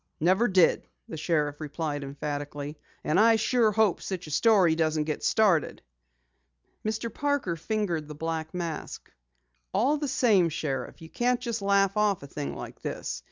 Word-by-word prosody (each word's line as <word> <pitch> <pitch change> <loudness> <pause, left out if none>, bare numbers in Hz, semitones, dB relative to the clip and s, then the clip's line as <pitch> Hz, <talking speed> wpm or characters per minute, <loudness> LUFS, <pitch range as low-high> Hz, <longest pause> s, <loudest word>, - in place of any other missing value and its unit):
"Never 185 +9 +3
did," 185 -5 +3 0.2
the - - -7
sheriff 150 -2 -1
replied 150 -1 -3
emphatically. 145 +1 -5 0.3
"And 155 - +2
I 225 +1 +6
sure 225 0 +2
hope 215 -3 +2
such 185 -2 -5
a 155 - -9
story 190 -1 +4
doesn't 155 -1 +1
get 155 0 -4
started." 195 -8 +2 1.0
Mr. 220 +1 -3
Parker 285 - -1
fingered 170 -4 -2
the 150 - -8
black 160 0 -3
mask. 170 -3 -5 0.6
"All 265 +9 +3
the 295 0 -3
same, 220 -10 +3
Sheriff, 140 -2 -4
you 160 - -10
can't 245 +5 +1
just 235 -3 -3
laugh 195 0 +2
off 205 -6 +2
a - - -8
thing 145 +1 -5
like - - -9
this. - - -4
175 Hz, 160 wpm, -27 LUFS, 155-220 Hz, 1.0 s, I